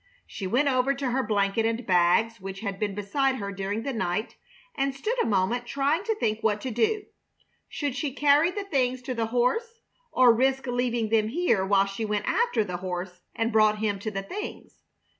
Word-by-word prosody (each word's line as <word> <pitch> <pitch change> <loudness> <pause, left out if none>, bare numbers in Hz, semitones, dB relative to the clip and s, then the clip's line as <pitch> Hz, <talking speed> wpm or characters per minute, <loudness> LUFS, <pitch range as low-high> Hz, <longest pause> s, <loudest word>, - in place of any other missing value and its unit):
She 195 - -6
went 255 +9 +2
over 265 +1 +2
to 270 -2 -2
her 265 +2 +1
blanket 210 -1 +1
and 230 +1 -1
bags, 185 +4 +3
which 195 +1 -7
had 200 -3 -4
been 205 -2 -2
beside 260 +7 0
her 200 -5 -4
during 200 +3 -3
the 275 - -3
night, 190 0 -2 0.4
and 275 - -1
stood 425 - -2
a - - 0
moment 225 +4 0
trying 285 +7 0
to 445 -1 0
think 220 - -1
what 210 -2 +1
to 260 - -4
do. 405 - 0 0.6
Should 285 -4 -3
she 280 0 -2
carry 290 +4 +4
the 405 +2 -4
things 255 -8 0
to 255 0 -3
the 230 -2 -1
horse 455 - 0 0.3
or 250 -2 +6
risk 265 +3 +1
leaving 245 -2 -1
them 220 -1 +2
here 240 - +1
while 195 0 +3
she 195 +3 -5
went 210 -1 -1
after 470 - +2
the 180 -3 -4
horse 180 0 -5
and 225 +1 0
brought 215 -1 +4
him 210 -2 -1
to 215 +2 -3
the 195 -2 -4
things? 410 - -7
230 Hz, 200 wpm, -26 LUFS, 200-270 Hz, 0.6 s, or